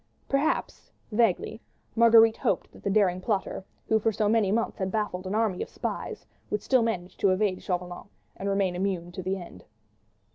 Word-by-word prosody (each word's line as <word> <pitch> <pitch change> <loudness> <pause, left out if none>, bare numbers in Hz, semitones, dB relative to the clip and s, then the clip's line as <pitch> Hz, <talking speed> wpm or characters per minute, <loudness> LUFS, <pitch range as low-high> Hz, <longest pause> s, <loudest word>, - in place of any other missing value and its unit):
Perhaps—vaguely—Marguerite 230 - +2
hoped - - -1
that - - -16
the - - -1
daring 190 -3 +2
plotter, 195 -2 -2 0.2
who 220 - +3
for 225 +1 +1
so 215 0 0
many 210 -2 +3
months 225 +1 -1
had 190 -1 -1
baffled 195 -4 -2
an 195 - -2
army 215 -5 +1
of - - -4
spies, - - -5 0.2
would 210 - -2
still 260 -2 +3
manage 190 -6 -2
to 200 - +3
evade 185 0 +1
Chauvelin 180 -1 -4 0.3
and 200 - -3
remain 195 -2 +1
immune 180 -2 -2
to 180 - -6
the 190 +2 -2
end. 170 - -11
200 Hz, 170 wpm, -27 LUFS, 185-220 Hz, 0.3 s, who